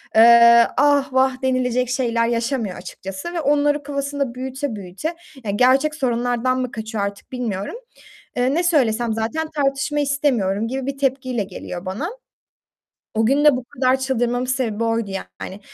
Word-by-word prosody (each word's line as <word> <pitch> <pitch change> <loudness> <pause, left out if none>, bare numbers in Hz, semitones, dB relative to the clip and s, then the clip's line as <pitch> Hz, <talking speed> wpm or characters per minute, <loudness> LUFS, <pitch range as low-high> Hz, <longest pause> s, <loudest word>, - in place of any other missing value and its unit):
eee, 235 +1 +8
ah 285 -1 +3
vah 260 0 +2
denilecek 255 -1 0
şeyler 235 -2 +1
yaşamıyor 235 -4 -1
açıkçası 195 - -7
ve 335 - -2
onları 290 0 +2
kafasında 280 -2 -3
büyüte 265 0 -4
büyüte, 200 - -5 0.3
yani 205 -1 -2
gerçek 270 +5 +3
sorunlardan 245 -1 0
mı 255 - -3
kaçıyor 220 -2 -4
artık 200 +4 -6
bilmiyorum. 225 - -3 0.6
Eee, 255 +2 +2
ne 345 - +1
söylesem 240 -9 +2
zaten 230 +9 -2
tartışma 280 +1 0
istemiyorum 245 -8 0
gibi 265 +1 -3
bir 275 - -3
tepkiyle 260 -4 -1
geliyor 180 -1 -8
bana. 210 - -3 1.1
O 220 0 +2
gün 280 +4 +3
de 295 -4 +6
bu 250 - -5
kadar 255 +1 +1
çıldırmamın 245 -1 0
sebebi 235 -4 -1
oydu 225 -2 -1
yani. 195 0 -7
255 Hz, 150 wpm, -21 LUFS, 230-275 Hz, 1.1 s, eee